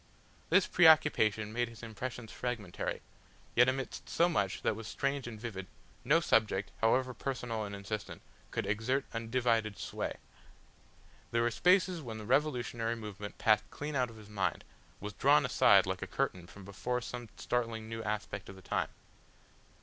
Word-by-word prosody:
This 185 +2 +5
preoccupation 145 - +5
made 120 0 0
his 115 0 -13
impressions 115 +1 -6
fragmentary. 115 -8 -3 0.5
Yet 125 +2 +6
amidst 135 0 -4
so 170 - +4
much 100 - 0
that 110 - +2
was 110 0 -7
strange 140 -2 -2
and 110 -2 -7
vivid, 100 -5 -5 0.4
no 140 +6 +5
subject, 110 - +2
however 130 +3 +3
personal 115 -3 -3
and 100 0 -6
insistent, 100 +1 -5 0.3
could - - -2
exert 110 +7 0
undivided 115 -2 0
sway. - - -4 1.1
There 115 0 +1
were 120 - +2
spaces 180 - +3
when 115 -5 -6
the 110 - -7
revolutionary 120 -3 +1
movement 105 -2 -7
passed 110 -1 +3
clean 145 0 -5
out 125 -2 +1
of 115 - -12
his 105 -1 -12
mind, 105 -2 -1 0.4
was 105 +1 -6
drawn - - +4
aside - - +6
like - - -3
a - - -3
curtain 90 -1 -2
from 100 0 -12
before 125 +5 -2
some 120 -1 -6
startling 115 -2 -2
new 115 0 -5
aspect 105 -2 -4
of 100 - -9
the 95 - -14
time. - - -1
115 Hz, 160 wpm, -32 LUFS, 105-125 Hz, 1.1 s, Yet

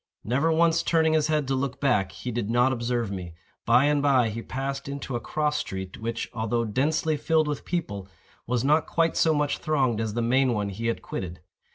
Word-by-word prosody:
Never 140 +8 +1
once 165 +1 +3
turning 160 -1 +2
his 155 -1 +2
head 155 -3 0
to 135 - 0
look 135 0 -2
back, 105 -9 +2
he 120 +6 -6
did 115 -2 -2
not 120 +3 +3
observe 120 -3 -1
me. 90 -4 -6 0.3
By 120 +4 +5
and 145 -1 +2
by 130 -5 +3
he 115 +2 -5
passed 135 +3 -4
into 140 -2 -5
a - - 0
cross 150 +3 -1
street, 95 -8 -5
which, 115 +1 -3
although 115 0 -1
densely 150 +7 0
filled 155 +1 +2
with 145 -2 -3
people, 105 - -3 0.4
was 120 0 0
not 150 +3 +3
quite 165 -1 +1
so 160 - +3
much 145 -1 0
thronged 130 -8 +1
as 110 -1 -3
the 120 - 0
main 130 +2 +3
one 105 -2 -1
he 110 +4 -4
had 115 - -2
quitted. 90 -3 -6
130 Hz, 210 wpm, -26 LUFS, 115-150 Hz, 0.4 s, By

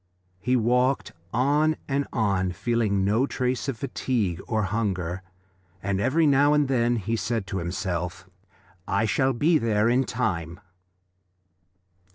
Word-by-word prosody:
He 125 +6 +1
walked 125 +3 +1 0.2
on 145 +6 +2
and 140 0 -1
on, 100 -5 0
feeling 105 -3 0
no 110 +7 +2
trace 125 0 -2
of 130 - -3
fatigue 110 -8 -2
or 110 -2 0
hunger, 95 -3 -2 0.6
and 100 0 -1
every 150 +8 +2
now 145 0 +4
and 150 -1 +2
then 120 -2 +2
he 110 +1 -2
said 115 -2 -2
to 95 -1 -3
himself: 90 0 -3 0.6
"I 100 +3 +1
shall 130 +6 +2
be 155 +6 +3
there 110 -1 +2
in 130 +2 +2
time." 85 -4 -2
115 Hz, 135 wpm, -25 LUFS, 95-130 Hz, 0.6 s, now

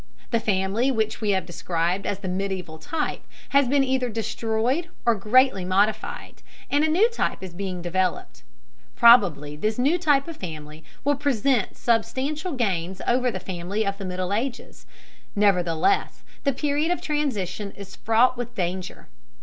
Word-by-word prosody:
The 230 - +2
family 205 +3 +1
which 220 -4 -1
we 215 - 0
have 190 -2 +1
described 175 +2 -2
as 200 - -1
the 195 -1 -7
medieval 180 -3 -3
type 305 - -3 0.3
has 280 -1 +4
been 275 +2 +3
either 260 -2 0
destroyed 230 +7 -1 0.2
or 235 - +5
greatly 220 0 +3
modified, 205 +4 -1 0.3
and 290 +1 +3
a - - +3
new 370 +9 +4
type 465 - -2
is 185 -2 -7
being 185 -1 -5
developed. 180 +1 -2 0.5
Probably 180 - +5
this 215 +8 -1
new 285 +8 +2
type 290 -4 +2
of 330 - -7
family 155 -3 -8 0.2
will 290 +2 +3
present 270 -5 0
substantial 260 - -1
gains 190 -7 -1
over 250 +1 +2
the 190 - -4
family 185 +4 -3
of 200 +1 -2
the 195 - -5
Middle 185 +1 -2
Ages, 245 +4 -4 0.5
nevertheless 190 - +2 0.2
the 280 - +4
period 295 +4 0
of 355 - 0
transition 225 - -2
is 200 -1 -10
fraught 230 +3 +3
with 240 0 -6
danger. 180 0 -4
215 Hz, 155 wpm, -24 LUFS, 185-265 Hz, 0.5 s, or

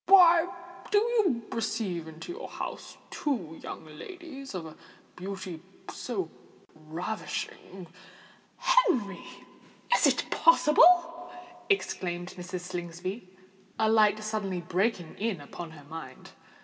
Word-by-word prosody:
"Why 350 -3 +8 0.4
do 420 - +4
you 415 - +2
receive 215 -7 -2
into 160 - -8
your 435 +7 -6
house - - -6
two 185 - -2
young - - -7
ladies 275 - -9
of 175 -3 -4
a 155 - -9 0.4
beauty 185 -3 -6 0.3
so 200 -9 -3 0.5
ravishing——" 175 +3 -5 0.7
"Henry! - - +2 0.7
is - - +5
it - - +2
possible?" 345 -4 +5 0.4
exclaimed 175 - 0
Mrs. 180 0 -5
Slingsby, 180 +3 -5 0.5
a 220 0 +3
light 215 -1 +4
suddenly 205 -4 -2
breaking 180 0 -1
in 210 -5 -1
upon 165 +4 -8
her 155 -2 -13
mind. 145 -3 -9
200 Hz, 110 wpm, -29 LUFS, -, 0.7 s, Why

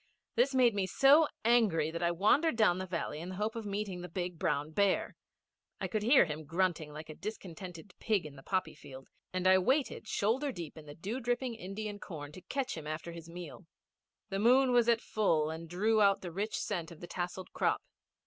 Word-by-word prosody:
This 265 +3 +2
made 245 -3 +5
me 195 -2 0
so 285 - +6 0.2
angry 205 -10 +3
that 170 - -4
I 170 - +3
wandered 215 - +3
down 210 -5 +3
the 185 - -4
valley 170 -4 -3
in 170 +3 -6
the 185 - -6
hope 215 +3 -2
of 225 -2 -5
meeting 200 -3 -3
the 180 - -7
big 175 -1 -4
brown 150 -3 0
bear. 200 +3 +1 0.6
I - - -2
could 215 - -1
hear 240 +1 +6
him 155 -1 -5
grunting 165 -2 0
like 155 +2 -8
a 155 - -7
discontented 180 -2 -8
pig 210 -7 +1
in 150 -2 -9
the 135 - -12
poppy 185 +5 -1
field, 135 0 -12 0.2
and 185 0 -2
I 185 0 +7
waited 260 +2 0
shoulder 255 +9 +1
deep 170 - -7
in 155 -1 -12
the 145 - -9
dew 205 +9 -4
dripping 245 0 -1
Indian 205 0 -6
corn 150 -7 -7
to 185 - -11
catch 270 +6 -3
him 155 -2 -7
after 155 +2 -4
his 170 0 -10
meal. 165 -5 -9 0.6
The 195 - -2
moon 255 +4 +5
was 240 -1 +4
at 230 -1 +3
full 160 -10 +1
and 165 +1 -7
drew 215 +5 +2
out 200 -1 +4
the 175 - -6
rich 205 +5 -2
scent 175 -6 -3
of 165 - -12
the - - -7
tasselled 180 +1 -5
crop. - - +1
185 Hz, 215 wpm, -32 LUFS, 165-220 Hz, 0.6 s, I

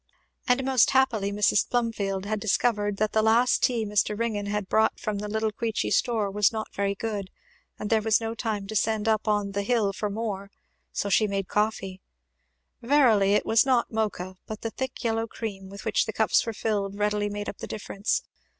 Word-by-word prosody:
And 250 +1 +3
most 260 -2 +4
happily 235 -7 +2
Mrs. 205 +1 +2
Plumfield 205 -5 -1
had 215 +1 -2
discovered 205 -1 +1
that 215 +1 0
the 220 - +2
last 230 +3 +3
tea 235 -4 +1
Mr. 210 0 0
Ringgan 215 -3 -2
had 205 -1 -2
brought 220 +2 +2
from 210 -2 -3
the 210 - -4
little 220 +1 -1
Queechy 225 +1 -2
store 220 -5 +1
was 210 0 +3
not 220 -1 -5
very 200 0 -1
good, 205 -3 -4 0.5
and 210 - -4
there 220 -1 +4
was 220 0 +3
no 225 0 -3
time 220 -4 -3
to 220 +2 -6
send 220 +1 +1
up 220 0 +1
on 205 -1 +1
"the 200 +1 -1
hill" 210 -2 +1
for 210 +1 -3
more, 200 -2 -4 0.4
so 200 - -2
she 210 +3 +3
made 195 -2 -2
coffee. 195 -3 -1 0.8
Verily 230 -7 +4
it 210 - +2
was 225 0 +4
not 255 -3 +1
Mocha, 200 -4 -2
but 215 0 -6
the 225 - -3
thick 260 +3 -5
yellow 225 -1 0
cream 200 -4 -6
with 200 +1 -10
which - - +1
the - - -3
cups - - +3
were - - 0
filled 205 -2 -2
readily 210 0 0
made 205 0 -5
up - - -6
the - - -6
difference. 210 - -2
215 Hz, 200 wpm, -26 LUFS, 200-225 Hz, 0.8 s, most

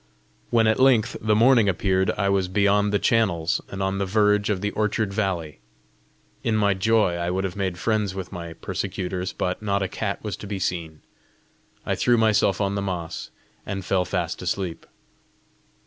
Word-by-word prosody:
When 115 -1 +3
at 110 +2 +2
length 130 -5 +4
the 110 0 +2
morning 115 -2 +5
appeared, 95 +1 +1
I 100 - +1
was 100 -1 +1
beyond 100 +2 +2
the 105 - +3
channels, 100 -7 +1
and 95 0 -4
on 95 0 -1
the 100 - 0
verge 105 +1 +2
of 100 -3 0
the 105 0 -1
orchard 105 -1 -1
valley. 95 -7 -2 0.8
In 115 - +1
my 100 -2 +3
joy 100 -2 +2
I 85 0 -2
would 95 +2 -1
have 95 -2 -3
made 95 -3 -2
friends 105 -1 0
with 95 -1 -6
my 85 -2 -7
persecutors, 90 +2 -4
but 90 +2 -3
not 100 -2 0
a - - -1
cat 100 +1 -4
was 105 -4 -3
to 105 - -9
be 100 0 -3
seen. 85 -4 -3 0.8
I - - 0
threw 120 -1 +2
myself 110 -4 +3
on 100 -1 0
the 100 - -1
moss, 90 -4 -4 0.3
and 95 -1 -5
fell 95 -2 +2
fast 90 - -3
asleep. 90 -4 -3
100 Hz, 180 wpm, -24 LUFS, 95-105 Hz, 0.8 s, morning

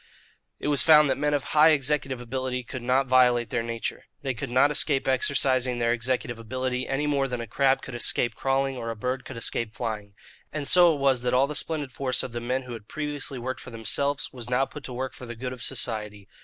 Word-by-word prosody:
It - - -4
was 145 -4 +4
found 150 -2 +6
that - - +2
men 145 0 +1
of 140 - -1
high 155 +1 +7
executive 140 -3 +1
ability 125 +1 -3
could 130 +1 -7
not 130 +3 +2
violate 125 -2 +3
their 120 - 0
nature. 115 0 -4 0.2
They 135 -2 -1
could 115 - -5
not 130 +4 +4
escape 145 -2 +1
exercising 130 -1 +2
their 120 0 +2
executive 120 -1 -2
ability, 130 +2 -3
any 135 +2 -1
more 140 -2 +1
than 125 -2 -4
a 115 - -4
crab 135 +4 +1
could 140 - -8
escape 120 0 0
crawling 135 +2 0
or 115 -1 -4
a 115 - -3
bird 125 +4 -3
could 130 - -8
escape 115 -1 -2
flying. 105 -4 -5 0.4
And 145 -2 -2
so 175 +3 +7
it - - -5
was 135 -3 +2
that 125 0 0
all 130 +2 +5
the 145 - -5
splendid 150 -2 -4
force 130 0 +1
of 130 - -5
the 120 0 -4
men 130 +2 -1
who 125 -1 -8
had 110 -2 -9
previously 150 -2 -3
worked 130 +2 -4
for - - -10
themselves 140 +5 -1
was 120 -2 -5
now 125 +2 +2
put 145 +1 -10
to 125 - -6
work 130 +1 -4
for 125 - -10
the 120 - -6
good 125 +2 -5
of 125 - -10
society. 105 -6 -4
130 Hz, 235 wpm, -26 LUFS, 120-135 Hz, 0.4 s, high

